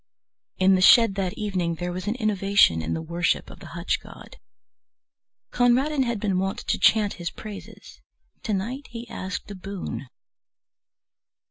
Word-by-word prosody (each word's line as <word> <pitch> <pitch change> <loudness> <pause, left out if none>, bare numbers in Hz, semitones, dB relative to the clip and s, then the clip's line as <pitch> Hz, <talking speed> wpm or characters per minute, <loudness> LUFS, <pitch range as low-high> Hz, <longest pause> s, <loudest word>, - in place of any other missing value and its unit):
In 190 +1 +5
the 185 - +3
shed 230 +2 +7
that 190 -2 -2
evening 185 -5 -2
there 175 +2 -4
was 185 +2 -5
an 215 - 0
innovation 200 - +3
in 80 - -2
the 160 - -4
worship 170 +2 -1
of - - -13
the - - -11
hutch - - 0
god. - - -13 1.1
Conradin 260 +4 +2
had 235 -3 -2
been 195 -3 0
wont 195 +1 -1
to - - +1
chant 210 -2 +4
his 170 - -2
praises, 210 -2 -11 0.4
to 220 - -3
night 245 +9 -4
he 235 0 -8
asked 190 -3 -5
a - - -6
boon. 185 - -6
195 Hz, 155 wpm, -25 LUFS, 180-225 Hz, 1.1 s, shed